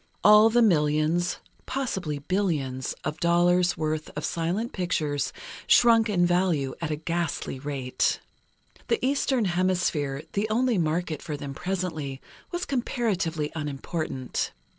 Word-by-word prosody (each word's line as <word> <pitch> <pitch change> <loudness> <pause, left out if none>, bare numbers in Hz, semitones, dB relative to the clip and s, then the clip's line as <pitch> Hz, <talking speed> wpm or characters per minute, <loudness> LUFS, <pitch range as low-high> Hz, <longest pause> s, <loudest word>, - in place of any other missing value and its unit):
All 210 +2 +8
the 240 +1 +4
millions 160 -1 +2 0.3
(possibly 190 - -2
billions) 140 -6 -1
of 150 - -3
dollars' 175 +1 +3
worth 155 0 -2
of 150 - -2
silent 180 +9 -2
pictures, 155 -6 -1 0.4
shrunk 230 -2 +5
in 180 -4 +3
value 175 -7 +1
at 165 - -2
a 155 - 0
ghastly 165 -3 -3
rate. 135 -2 -1 0.7
The 465 - +2
Eastern 265 -3 +1
Hemisphere, 175 -6 0
the 210 +2 0
only 235 -1 +2
market 160 -1 -1
for 150 -3 -5
them 140 -1 -6
presently, 160 -5 -3 0.3
was 350 0 -3
comparatively 190 - -1
unimportant. 145 -3 -3
170 Hz, 120 wpm, -26 LUFS, 150-200 Hz, 0.7 s, All